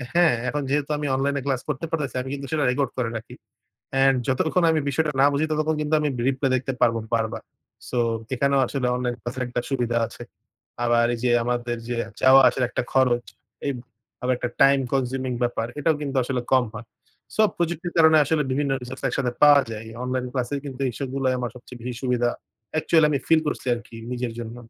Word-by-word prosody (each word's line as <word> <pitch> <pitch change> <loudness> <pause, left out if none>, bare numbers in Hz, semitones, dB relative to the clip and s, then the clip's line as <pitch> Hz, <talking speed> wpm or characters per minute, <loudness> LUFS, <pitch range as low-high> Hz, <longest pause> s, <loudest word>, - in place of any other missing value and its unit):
হ্যাঁ 175 -6 +5 0.2
এখন 150 -1 -2
যেহেতু 145 +1 0
আমি 145 0 -2
অনলাইনে 140 +1 0
ক্লাস 135 -3 0
করতে 150 +2 -2
পারতেছি 145 -6 -2
আমি 130 - -6
কিন্তু 140 -1 -5
সেটা 155 -2 +1
রেকর্ড 135 +1 0
করে 125 -3 0
রাখি। 110 +1 -10 0.6
অ্যান্ড 135 0 +4
যতক্ষণ 160 +7 +1
আমি 160 -1 +2
বিষয়টা 150 +2 0
না 140 - +7
বুঝি 140 +2 +1
ততক্ষণ 155 0 0
কিন্তু 150 +1 0
আমি 150 - +1 0.2
রিপ্লে 135 +1 0
দেখতে 130 +1 -1
পারবো 115 -2 +3 0.2
বারবার। 115 -1 -1 0.5
সো 125 - -2 0.4
এখানেও 140 +1 +2
আসলে 130 0 -2
অনলাইন 125 -1 -1
ক্লাস 120 +3 -5
এর - - 0
একটা 120 0 -2
সুবিধা 120 -3 0
আছে। - - -11 0.6
আবার 120 0 +3
এই 120 - -4
যে 125 - +2
আমাদের 120 0 -1
যে 120 - -2 0.3
যাওয়া 130 +1 +8
আসার 130 - +1
একটা 125 - -2
খরচ, 125 -2 +3 0.4
এই 140 - +1 0.5
আবার 125 0 +2
একটা 120 - -3
টাইম 140 0 +6
কনজিউমিং 130 -1 -1
ব্যাপার, 120 -1 -1
এটাও 160 +2 +2
কিন্তু 140 -2 -4
আসলে 125 0 -2
কম 130 -2 +5
হয়। 115 +1 -8 0.5
সো - - +3 0.2
প্রযুক্তির 170 0 -2
কারণে 160 -1 +7
আসলে 150 +1 +1
বিভিন্ন 140 +1 0
রিসোর্স 125 - -8
একসাথে 125 -2 -1
পাওয়া 145 -1 +8
যায়। 110 +1 -7 0.2
অনলাইন 125 0 -2
ক্লাসের 130 +2 -2
কিন্তু 135 -1 -6
এইসবগুলায় 130 +1 -1
আমার 120 -2 -3
সবচেয়ে 125 0 -12
বেশি 125 0 -5
সুবিধা 120 -2 +1 0.4
অ্যাকচুয়ালি 155 0 +3
আমি 140 - +1
ফিল 160 -1 +5
করছি 145 - -3
আরকি 115 -1 -11 0.2
নিজের 120 -2 -3
জন্য। 115 0 -6
130 Hz, 195 wpm, -24 LUFS, 125-145 Hz, 0.6 s, যাওয়া